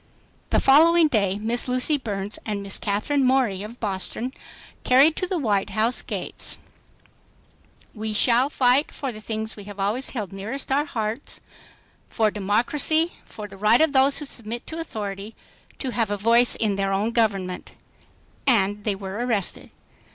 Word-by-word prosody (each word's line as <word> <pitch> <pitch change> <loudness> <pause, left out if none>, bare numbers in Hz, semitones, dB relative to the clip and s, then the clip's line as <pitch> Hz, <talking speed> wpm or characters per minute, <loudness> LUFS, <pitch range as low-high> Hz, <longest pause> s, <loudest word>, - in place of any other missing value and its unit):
The - - +3
following 325 +4 +6
day 200 -6 +1
Miss 230 +4 -1
Lucy 255 +4 +1
Burns 205 -6 -4
and 205 -2 -3
Miss 195 -1 -1
Katherine 215 +8 0
Morey 255 -7 +2
of 220 +4 -9
Boston 215 +5 -3 0.5
carried 275 +5 +5
to 365 - -1
the 370 - -1
White 210 -9 0
House 225 +3 +1
gates - - -4 1.4
"We 220 -1 -4
shall 240 +5 +4
fight 260 +1 +2
for 275 -3 -4
the 215 -2 -10
things 220 0 -4
we 205 - -10
have 205 -1 -10
always 215 +7 0
held 210 -7 -4
nearest 225 +9 -5
our 285 +2 +2
hearts, 225 -1 -4 0.7
for 220 -2 +1
democracy, 245 - +1
for 210 -1 -9
the 195 -1 -13
right 215 +4 +4
of 315 -2 +3
those 270 +1 +4
who 295 - -5
submit 235 -2 -5
to 325 - -6
authority 210 -7 -6 0.4
to 260 - -4
have 230 -3 0
a 205 - -1
voice 235 +4 +4
in 210 -3 0
their 195 0 0
own 205 +4 0
government," 195 -6 -1 0.7
and 205 -4 +2 0.2
were 195 +4 -4
arrested. 220 -6 -1
225 Hz, 160 wpm, -24 LUFS, 205-265 Hz, 1.4 s, following